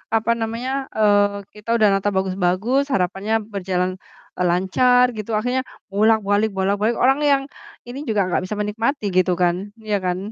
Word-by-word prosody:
apa 225 +1 +1
namanya, 230 +4 -3 0.3
eee, 205 -1 +2
kita 210 +2 -12
udah 215 -2 +4
nata 195 +1 +1
bagus-bagus 190 +7 +1
harapannya 195 +3 -1 0.2
berjalan, 185 -1 -1 0.5
eee, 180 - -1
lancar 245 +8 +3
gitu 215 +1 -5
akhirnya 250 +3 -1 0.3
bolak-balik 210 +1 +2
bolak-balik. 205 +4 0
Orang 270 +3 +3
yang 280 -2 +3 0.4
ini 255 +3 -7
juga 205 -3 +1
nggak 175 - 0
bisa 210 +3 -4
menikmati 220 +4 -1
gitu 185 0 +3
kan. 175 -1 +3 0.2
Iya 215 -2 -1
kan? 180 0 0
210 Hz, 150 wpm, -21 LUFS, 190-230 Hz, 0.5 s, udah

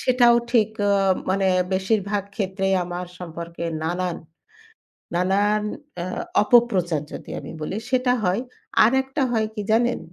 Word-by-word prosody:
সেটাও 245 -2 +5
ঠিক 225 -3 +3 0.2
আ - - +4 0.4
মানে 195 0 +2 0.3
বেশিরভাগ 200 +1 0
ক্ষেত্রেই 195 -1 0
আমার 175 +1 -5
সম্পর্কে 170 -1 -7 0.2
নানান, 175 +1 -1 1.0
নানান 200 +4 +2 0.4
আ - - -4 0.4
অপপ্রচার 190 - +3
যদি - - -8
আমি - - -9
বলি 185 +6 -3
সেটা 250 -1 +2
হয়। 185 +5 +1 0.4
আরেকটা 265 +4 +1
হয় 220 -2 +1
কি 210 - -3
জানেন? 240 +2 +2
200 Hz, 125 wpm, -23 LUFS, 180-235 Hz, 1.0 s, সেটাও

